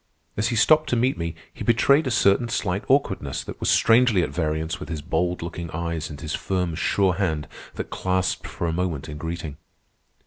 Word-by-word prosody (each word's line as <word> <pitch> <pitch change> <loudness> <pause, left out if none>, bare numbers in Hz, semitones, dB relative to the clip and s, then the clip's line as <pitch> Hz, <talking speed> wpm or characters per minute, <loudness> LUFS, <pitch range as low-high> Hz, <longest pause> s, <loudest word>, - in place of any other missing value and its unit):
As 105 +2 0
he 120 - -1
stopped 155 +7 +4
to - - +2
meet 125 +3 +2
me, 85 -1 -4 0.2
he - - -7
betrayed 135 +6 +4
a - - +1
certain 115 0 +3
slight 100 -3 -1
awkwardness 95 - +1
that - - -8
was - - 0
strangely 115 -5 +4
at - - -3
variance 80 0 -2
with 90 - -8
his 80 -2 -3
bold 90 +2 -1
looking 85 0 -5
eyes 85 0 -3
and 75 -2 -8
his 75 -1 -5
firm, 90 -3 -1
sure 95 +3 +2
hand 80 -5 -1 0.3
that - - -5
clasped 95 0 -1
for - - -4
a 80 - 0
moment 85 -4 -2
in 75 -1 -7
greeting. 80 -2 -5
90 Hz, 200 wpm, -24 LUFS, 80-110 Hz, 0.3 s, stopped